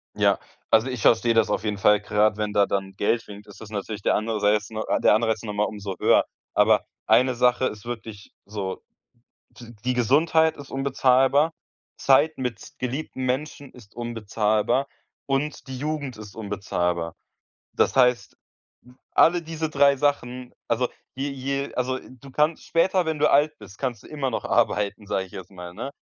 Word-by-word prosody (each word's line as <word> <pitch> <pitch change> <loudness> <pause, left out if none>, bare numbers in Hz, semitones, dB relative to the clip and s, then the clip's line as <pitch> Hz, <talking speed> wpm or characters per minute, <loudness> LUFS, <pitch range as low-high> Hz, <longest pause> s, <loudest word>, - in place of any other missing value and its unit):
Ja, - - +3 0.3
also, 110 +3 +5
ich 125 -4 -4
verstehe 115 +2 +4
das 115 -1 +3
auf - - -1
jeden 105 -2 -2
Fall, 105 +1 +4
gerade 105 0 +2
wenn 105 -1 -2
da 100 -1 +4
dann 95 -1 -3
Geld 115 +4 0
winkt, 105 0 -11
ist 105 - -14
das 110 - -9
natürlich 105 0 -5
der - - +2
Anseiz 105 -1 +1
ne, 110 -1 -4 0.2
der - - +6
Anreiz 110 0 +1
ist - - -13
noch 105 - -4
mal 105 0 +1
umso 100 -2 -5
höher. - - +4 0.3
Aber - - +4 0.2
eine 130 0 +4
Sache 125 +1 +3
ist 105 -3 -4
wirklich 110 -4 -8
so, 100 -2 -5 0.7
d 120 -1 -13
die 125 - +1
Gesundheit 160 +7 +3
ist 145 -2 -11
unbezahlbar, 135 +2 +3 0.4
Zeit 145 +4 +3
mit 125 -4 -5
geliebten 130 +1 -4
Menschen 140 +2 -3
ist 115 -5 -17
unbezahlbar 115 +2 0 0.4
und 140 +2 -2
die 130 -1 -6
Jugend 145 -3 -3
ist 105 -2 -11
unbezahlbar. 90 -5 -2 0.6
Das - - +1
heißt, 125 -5 +3 0.8
alle 175 +1 +4
diese 160 -1 -4
3 140 -1 +4
Sachen 125 -3 -1
also, 120 +2 0 0.3
je 135 +2 -2
je 140 +1 -3
also, 130 +1 -1
du 130 +1 -14
kannst 150 +4 +1
später, 180 +2 +2
wenn 160 -1 -2
du 150 - +4
alt 150 +2 +3
bist, 100 -1 -13
kannst 125 -6 -3
du - - -13
immer 145 -4 -3
noch - - -3
arbeiten, 105 0 +1
sage 95 -1 -1
ich 95 - -18
jetzt 95 -2 -9
mal, 90 -2 -9
ne? 135 - -6
120 Hz, 175 wpm, -24 LUFS, 105-140 Hz, 0.8 s, der